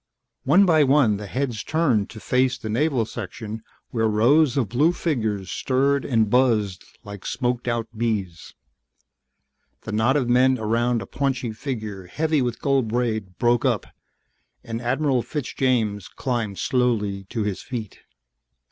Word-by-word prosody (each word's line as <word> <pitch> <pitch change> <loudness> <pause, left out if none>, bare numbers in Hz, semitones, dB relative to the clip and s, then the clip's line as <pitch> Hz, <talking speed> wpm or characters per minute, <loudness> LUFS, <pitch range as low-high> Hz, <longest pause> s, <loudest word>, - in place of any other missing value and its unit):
One 175 +9 +6
by 160 -4 +5
one 135 -7 +4
the 105 0 -7
heads 125 -1 -2
turned 135 -11 +1
to 110 - -10
face 125 +5 +1
the 110 - -5
Naval 125 -1 +1
section 110 0 -7 0.3
where 110 -2 +1
rows 125 +7 +3
of 125 -6 +1
blue 145 - +2
figures 110 - -2
stirred 140 0 +1
and 115 -4 +2
buzzed 110 -6 +2 0.2
like 100 -3 -9
smoked 125 -1 -2
out 120 -1 -1
bees. 105 -7 -3 1.3
The 110 - -7
knot 110 +6 +2
of 130 -4 0
men 130 +2 +4
around 115 +1 0
a - - -9
paunchy 130 -1 -2
figure 110 -5 -5
heavy 155 - 0
with 120 -2 -2
gold 135 -4 +2
braid 110 -5 -2
broke 120 +1 +2
up 125 -6 +1 0.8
and 115 0 -5
Admiral 130 +1 +1
Fitzjames 120 - -1
climbed 115 -6 -3
slowly 105 -6 0
to 110 - -2
his 105 -2 -3
feet. 115 -6 -6
120 Hz, 145 wpm, -23 LUFS, 110-130 Hz, 1.3 s, One